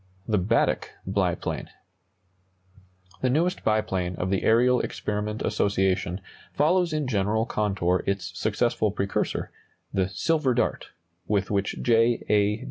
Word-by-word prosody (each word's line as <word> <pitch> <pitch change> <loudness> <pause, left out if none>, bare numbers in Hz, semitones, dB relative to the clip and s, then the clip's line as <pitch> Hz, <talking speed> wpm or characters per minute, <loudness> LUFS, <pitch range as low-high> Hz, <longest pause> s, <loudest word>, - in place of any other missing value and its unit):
THE 105 -3 +2
BADDECK 110 +6 +1 0.2
BIPLANE. - - -1 1.5
The 130 - +2
newest 170 +8 +1
biplane 95 -5 0
of 90 +2 -2
the 95 - +1
Aerial 125 +2 +4
Experiment 105 +1 -3
Association 95 -2 0 0.3
follows 175 +4 +2
in 155 -2 -1
general 110 -1 +1
contour 95 -5 0
its 95 -3 -1
successful 110 +1 +1
precursor, 100 0 -2 0.4
the 95 -2 +1
"Silver 145 - +1
Dart," - - 0 0.4
with 100 -2 0
which 100 -1 -1
J. 115 0 +3
A. 105 +1 +3
105 Hz, 120 wpm, -26 LUFS, 95-120 Hz, 1.5 s, Aerial